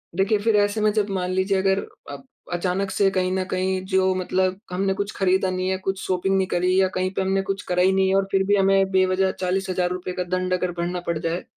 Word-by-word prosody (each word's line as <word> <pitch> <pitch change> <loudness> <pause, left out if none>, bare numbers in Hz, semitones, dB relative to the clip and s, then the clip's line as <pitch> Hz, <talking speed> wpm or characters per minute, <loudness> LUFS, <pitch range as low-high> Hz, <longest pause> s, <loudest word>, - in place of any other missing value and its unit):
देखिए, 195 +3 +2
फिर 220 +1 +1
ऐसे 205 +1 +2
में 215 0 +3
जब 210 -1 0
मान 185 -2 -2
लीजिए 190 +1 +1
अगर 190 0 +2 0.3
आप - - -9 0.3
अचानक 185 +2 -1
से 195 +1 +2
कहीं 185 -1 0
न 190 0 0
कहीं 185 0 0
जो 190 -1 +2
मतलब 185 +1 -1
हमने 195 +2 0
कुछ 200 +1 -3
खरीदा 190 0 +1
नहीं 185 0 -2
है 190 - 0
कुछ 190 0 -3
शॉपिंग 190 +1 0
नहीं 190 - +2
करी 180 +1 +1
या 190 - +3
कहीं 185 0 0
पे 195 - -1
हमने 190 0 +1
कुछ 195 0 -1
करा 180 0 +2
ही 190 - +4
नहीं 190 0 +2
है 190 - +2
और 195 0 +1
फिर 190 0 +2
भी 205 - +4
हमें 195 -1 +3
बेवजह 190 0 +2
₹40,000 185 -1 -2
का 180 - -1
दंड 185 +1 -2
अगर 180 0 0
भरना 175 +1 -3
पड़ 170 - 0
जाए, 165 +2 -3
190 Hz, 240 wpm, -23 LUFS, 185-195 Hz, 0.3 s, ही